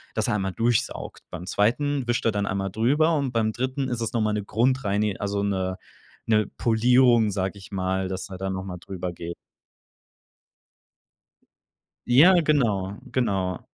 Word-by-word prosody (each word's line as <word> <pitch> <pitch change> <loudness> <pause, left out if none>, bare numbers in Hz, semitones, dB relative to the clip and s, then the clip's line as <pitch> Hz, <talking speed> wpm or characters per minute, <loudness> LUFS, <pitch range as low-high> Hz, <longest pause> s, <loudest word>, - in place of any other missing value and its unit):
dass - - 0
er - - +1
einmal 95 -2 -2
durchsaugt, 115 -1 -1
beim 90 0 -7
2. 130 +6 +1
wischt 120 0 0
er 115 - +4
dann 100 -1 -1
einmal 95 -1 -2
drüber 150 - +2
und 135 -3 -1
beim 110 -1 +1
3. 130 +1 -2
ist 120 -1 -3
es 115 - -2
noch 115 - +1
mal 110 0 +1
'ne 105 -1 -2
Grundreini 105 -4 0
also, 100 0 -2
'ne 95 -2 -1 0.5
'ne 110 -2 +3
Polierung, 120 -1 +4
sage 95 0 -2
ich 95 - -13
mal, 95 0 -1
dass 95 +1 -5
er 95 - -7
dann 95 0 -3
noch 95 0 -4
mal 90 -2 -6
drüber 90 -1 -5
geht. 85 +1 -7 2.7
Ja, 160 +10 +7
genau, 110 - +1 0.2
genau. 95 -8 0
105 Hz, 160 wpm, -25 LUFS, 95-120 Hz, 2.7 s, Ja